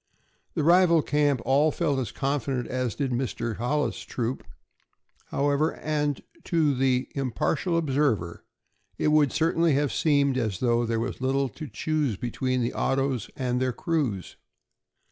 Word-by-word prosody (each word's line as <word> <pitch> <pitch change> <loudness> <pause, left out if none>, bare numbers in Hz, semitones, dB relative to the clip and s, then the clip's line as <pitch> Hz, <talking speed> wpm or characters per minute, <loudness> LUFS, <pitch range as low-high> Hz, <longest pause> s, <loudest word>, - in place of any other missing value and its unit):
The 160 - 0
rival 170 -1 +5
camp 145 -4 +1
all 145 +4 +4
felt 150 -4 0
as 125 - -3
confident 135 -3 -1
as 125 -3 -2
did 140 -3 -2
Mr. 120 -2 -2
Hollis' 125 +1 -1
troop, 115 +3 -4 0.8
however, 145 +3 0
and 150 -2 -2 0.2
to 160 -4 +2
the 130 -1 +1
impartial 140 - -1
observer 135 - 0 0.5
it - - +1
would 150 -3 +4
certainly 165 0 +2
have 145 0 +1
seemed 140 -5 +2
as 110 -6 -2
though 120 -1 +1
there 115 0 0
was 115 - -4
little 135 +1 +1
to 150 +8 -8
choose 150 -8 -1
between 125 +2 -1
the 120 - -2
autos 135 -4 0
and 125 -1 -1
their 130 -1 0
crews. 130 - -2
135 Hz, 145 wpm, -26 LUFS, 125-150 Hz, 0.8 s, rival